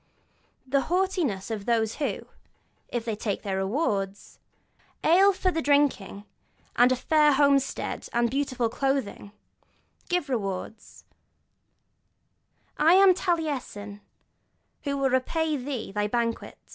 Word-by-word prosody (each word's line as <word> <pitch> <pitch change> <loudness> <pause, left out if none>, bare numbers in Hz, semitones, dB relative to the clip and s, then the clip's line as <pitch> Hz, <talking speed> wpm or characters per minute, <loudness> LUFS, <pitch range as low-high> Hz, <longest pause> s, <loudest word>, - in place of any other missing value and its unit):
They 270 +1 +1
have - - -4
the 350 - +2
haughtiness 325 - -1
of 210 -3 -5
those 225 -2 +1
who, 295 - -2 0.7
if 240 -2 -4
they 225 -2 -2
take 205 -2 -4
rewards, 195 0 -2 0.6
'ale 380 +5 +5
for 375 -1 0
the 325 - -2
drinking, 280 -9 +1 0.5
and 245 +1 +5
a - - +3
fair 300 +3 +3
homestead, 275 -1 +1
and 235 0 +2
beautiful 255 -1 -1
clothing,' 265 -4 -2 0.8
give 355 -4 0
rewards: 210 -4 -5 1.7
'I 315 +3 +5
am 385 -1 +7
Taliesin, 285 - -3 0.8
who 280 -1 -1
will 270 -1 +1
repay 310 +5 0
thee 255 -6 -5
thy 205 +1 -1
banquet.' 230 +1 -2
260 Hz, 120 wpm, -26 LUFS, 215-300 Hz, 1.7 s, am